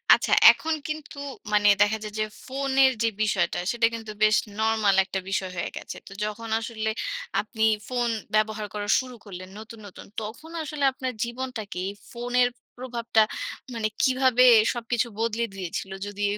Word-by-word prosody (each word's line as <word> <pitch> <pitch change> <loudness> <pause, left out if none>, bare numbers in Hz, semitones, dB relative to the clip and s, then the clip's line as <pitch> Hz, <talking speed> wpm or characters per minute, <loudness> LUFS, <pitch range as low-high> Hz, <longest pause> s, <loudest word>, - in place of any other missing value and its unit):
আচ্ছা - - -1 0.2
এখন 320 0 -2
কিন্তু 305 -1 -6 0.4
মানে 205 0 +4
দেখা 205 +1 +4
যায় 210 -1 -6
যে 215 - +2 0.2
ফোনের 270 0 +3
যে 230 - +3
বিষয়টা, 190 -5 +1
সেটা 235 -1 +2
কিন্তু 225 -1 -6
বেশ 215 0 +6 0.2
নরমাল 220 -2 +3
একটা 190 - -3
বিষয় 190 -1 -1
হয়ে 170 - -2
গেছে। - - -7
তো - - -11
যখন 225 +2 -5
আসলে 220 -1 -3 0.5
আপনি 220 +1 -4 0.2
ফোন 245 -1 0 0.3
ব্যবহার 215 0 +1
করা 205 -1 -4
শুরু 255 -1 -7
করলেন 185 -2 -9
নতুন, 220 +1 -11
নতুন 190 - -12 0.2
তখন 230 +10 -8
আসলে 300 -1 -4
আপনার 260 -1 -4
জীবনটাকে 235 -4 -5
এই 200 - -4 0.2
ফোনের 245 +1 +1 0.3
প্রভাবটা 235 -3 +1 0.5
মানে 225 -2 -1 0.2
কীভাবে 255 -1 +4 0.3
সবকিছু 240 -1 -1
বদলে 230 0 0
দিয়েছিল? 190 0 -5
যদি 205 0 -7
এই 205 - -2
225 Hz, 160 wpm, -26 LUFS, 210-250 Hz, 0.5 s, বেশ